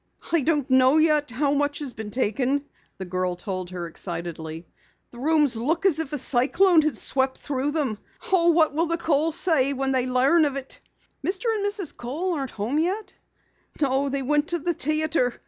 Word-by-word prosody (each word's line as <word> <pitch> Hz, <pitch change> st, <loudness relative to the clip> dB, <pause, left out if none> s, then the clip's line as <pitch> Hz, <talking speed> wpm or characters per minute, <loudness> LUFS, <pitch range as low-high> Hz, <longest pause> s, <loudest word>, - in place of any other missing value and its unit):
"I 335 Hz, -2 st, +3 dB
don't 290 Hz, -1 st, 0 dB
know 260 Hz, +2 st, +4 dB
yet 305 Hz, -2 st, +3 dB
how 280 Hz, +4 st, 0 dB
much 290 Hz, 0 st, 0 dB
has 280 Hz, -5 st, -5 dB
been 215 Hz, -1 st, -7 dB
taken," 255 Hz, +5 st, 0 dB, 0.3 s
the 190 Hz, -, -6 dB
girl 185 Hz, 0 st, -2 dB
told 185 Hz, 0 st, -5 dB
her 180 Hz, -1 st, -5 dB
excitedly. 165 Hz, -1 st, -6 dB, 0.5 s
"The 240 Hz, -, -12 dB
rooms 295 Hz, -3 st, +3 dB
look 320 Hz, -, -1 dB
as 335 Hz, -5 st, +4 dB
if 315 Hz, -3 st, -4 dB
a 295 Hz, -, -2 dB
cyclone 315 Hz, +8 st, +4 dB
had 305 Hz, -1 st, -1 dB
swept 265 Hz, -1 st, +1 dB
through 275 Hz, 0 st, -2 dB
them! 285 Hz, -9 st, -2 dB, 0.3 s
Oh, 340 Hz, -2 st, +4 dB
what 320 Hz, -3 st, +3 dB
will 330 Hz, +3 st, 0 dB
the 335 Hz, +1 st, 0 dB
Kohls 320 Hz, -1 st, +1 dB
say 310 Hz, -7 st, +2 dB
when 270 Hz, 0 st, -1 dB
they 255 Hz, -1 st, +1 dB
learn 270 Hz, +6 st, +3 dB
about 280 Hz, -1 st, -2 dB
it?" 270 Hz, -1 st, -6 dB, 0.4 s
"Mr. 415 Hz, +5 st, 0 dB
and 420 Hz, -2 st, -2 dB
Mrs. 405 Hz, -5 st, -2 dB
Kohl 315 Hz, +10 st, -3 dB
aren't 275 Hz, -5 st, -3 dB
home 230 Hz, +8 st, -2 dB
yet?" 380 Hz, +6 st, -2 dB, 0.7 s
"No, 275 Hz, -1 st, +1 dB
they 275 Hz, 0 st, -2 dB
went 295 Hz, +3 st, +1 dB
to 345 Hz, -, -1 dB
the 345 Hz, +2 st, -1 dB
theatre. 310 Hz, -4 st, 0 dB
285 Hz, 190 wpm, -24 LUFS, 250-320 Hz, 0.7 s, know